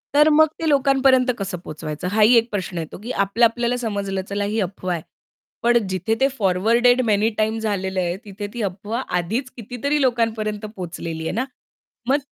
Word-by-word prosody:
तर 300 Hz, +1 st, +6 dB
मग 315 Hz, +1 st, +6 dB
ते 325 Hz, -, 0 dB
लोकांपर्यंत 270 Hz, -2 st, +4 dB
कसं 195 Hz, -2 st, -4 dB
पोहोचवायचं? 155 Hz, 0 st, -6 dB
हाही 220 Hz, +3 st, +5 dB
एक 230 Hz, +1 st, +2 dB
प्रश्न 185 Hz, -3 st, -3 dB
येतो, 160 Hz, -2 st, -5 dB
की 245 Hz, -, -4 dB
आपल्या-आपल्याला 235 Hz, +4 st, +2 dB
समजलं 200 Hz, -5 st, -2 dB
चला 205 Hz, 0 st, -1 dB
ही 215 Hz, +2 st, -1 dB
अफवा 185 Hz, -1 st, -3 dB
आहे, 165 Hz, -, -3 dB, 0.6 s
पण 240 Hz, 0 st, +5 dB
जिथे 185 Hz, +4 st, 0 dB
ते 270 Hz, -, +4 dB
फॉरवर्डेड 230 Hz, +6 st, +3 dB
मेनी 215 Hz, +1 st, +3 dB
टाईम्स 220 Hz, +1 st, 0 dB
झालेलं 190 Hz, -3 st, -1 dB
आहे, 175 Hz, 0 st, -1 dB
तिथे 205 Hz, 0 st, -6 dB
ती 240 Hz, -, -4 dB
अफवा 205 Hz, +5 st, -3 dB, 0.2 s
आधीच 225 Hz, +10 st, -2 dB
कितीतरी 250 Hz, +6 st, -2 dB
लोकांपर्यंत 225 Hz, -4 st, 0 dB
पोहोचलेली 170 Hz, -5 st, -6 dB
आहे -, -, -1 dB
ना, 255 Hz, +4 st, 0 dB, 0.6 s
मग 280 Hz, -, +5 dB
215 Hz, 170 wpm, -22 LUFS, 190-245 Hz, 0.6 s, तर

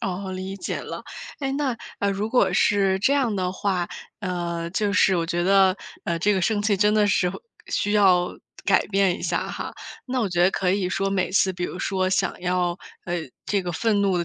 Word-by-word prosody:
啊， 190 Hz, 0 st, -3 dB
理 190 Hz, +1 st, -5 dB
解 -, -, -4 dB
了。 -, -, -7 dB, 0.4 s
诶， 270 Hz, -1 st, -1 dB
那 275 Hz, -3 st, -1 dB, 0.4 s
如 210 Hz, +3 st, -3 dB
果 250 Hz, -, +3 dB
是 195 Hz, -2 st, +3 dB
这 245 Hz, +8 st, +3 dB
样 255 Hz, -7 st, +1 dB
的 180 Hz, -1 st, -1 dB
话， 185 Hz, -2 st, -1 dB, 0.3 s
呃， 170 Hz, -3 st, -3 dB
就 205 Hz, +2 st, 0 dB
是 195 Hz, -2 st, +4 dB
我 165 Hz, -1 st, 0 dB
觉 175 Hz, +1 st, -1 dB
得， 190 Hz, 0 st, +5 dB, 0.3 s
呃， 170 Hz, -1 st, -1 dB
这 205 Hz, +5 st, +2 dB
个 190 Hz, -, +1 dB
生 205 Hz, +3 st, +1 dB
气 205 Hz, -1 st, +2 dB
真 210 Hz, +2 st, +3 dB
的 210 Hz, -1 st, +4 dB
是 180 Hz, -2 st, +2 dB, 0.4 s
需 205 Hz, -, -1 dB
要 185 Hz, -4 st, +4 dB, 0.3 s
改 -, -, +3 dB
变 195 Hz, -3 st, +2 dB
一 -, -, -11 dB
下 -, -, -1 dB
哈。 -, -, -6 dB, 0.3 s
那 255 Hz, 0 st, -1 dB
我 205 Hz, -, 0 dB
觉 175 Hz, 0 st, +2 dB
得 180 Hz, -, +5 dB
可 185 Hz, -2 st, 0 dB
以 190 Hz, -1 st, +1 dB
说 195 Hz, +1 st, -1 dB
每 195 Hz, -2 st, 0 dB
次 190 Hz, 0 st, +3 dB
比 175 Hz, 0 st, -3 dB
如 180 Hz, -, -5 dB
说 185 Hz, -1 st, 0 dB
想 190 Hz, -, 0 dB
要， 180 Hz, 0 st, 0 dB, 0.3 s
呃， 175 Hz, -1 st, -2 dB, 0.3 s
这 200 Hz, -1 st, 0 dB
个 175 Hz, -, -3 dB
愤 210 Hz, +4 st, +1 dB
怒 195 Hz, -2 st, +2 dB
的 170 Hz, -, 0 dB
190 Hz, 230 characters per minute, -24 LUFS, 180-205 Hz, 0.4 s, 得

